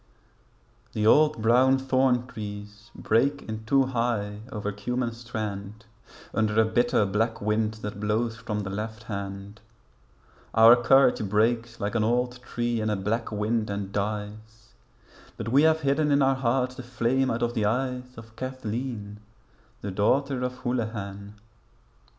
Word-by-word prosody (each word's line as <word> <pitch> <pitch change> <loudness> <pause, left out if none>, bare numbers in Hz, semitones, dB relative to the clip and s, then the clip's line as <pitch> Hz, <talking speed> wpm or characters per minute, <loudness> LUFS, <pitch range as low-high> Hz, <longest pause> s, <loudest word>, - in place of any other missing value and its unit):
The 105 - -1
old 150 0 +4
brown 130 +4 +5
thorn 130 -2 +2
trees 105 -1 -8
break 135 +6 +1
in 110 0 -6
two 135 +4 +4
high 115 -5 -1
over 105 -3 -3
Cummen 120 +4 -2
Strand 110 -2 -6 0.5
Under 110 0 +1
a 110 - +5
bitter 120 -1 +2
black 110 +4 0
wind 105 +1 0
that 105 -1 -5
blows 110 +2 0
from 110 -2 -4
the 95 -1 -5
left 110 +2 -5
hand, 100 0 -6 0.9
Our 115 +2 +9
courage 125 0 +4
breaks 115 +2 +1
like 100 0 -2
an 115 -2 +1
old 125 +2 0
tree 120 -2 -2
in 110 - -1
a 105 - +1
black 110 +5 -2
wind 110 +1 -1
and 100 -1 -4
dies; 110 +2 -5 0.6
But 115 0 -4
we 135 +4 +5
have 160 0 +4
hidden 145 +1 +1
in 140 0 +4
our 135 0 +4
hearts 130 0 0
the 130 - -8
flame 125 +2 0
out 115 0 -1
of 120 0 0
the 110 -3 0
eyes 125 +2 -2
Of 110 -1 -12
Cathleen 115 -4 -5 0.6
the 100 - -4
daughter 130 +7 +1
of 125 0 -2
Houlihan. 105 -4 -4
115 Hz, 150 wpm, -26 LUFS, 105-125 Hz, 0.9 s, Our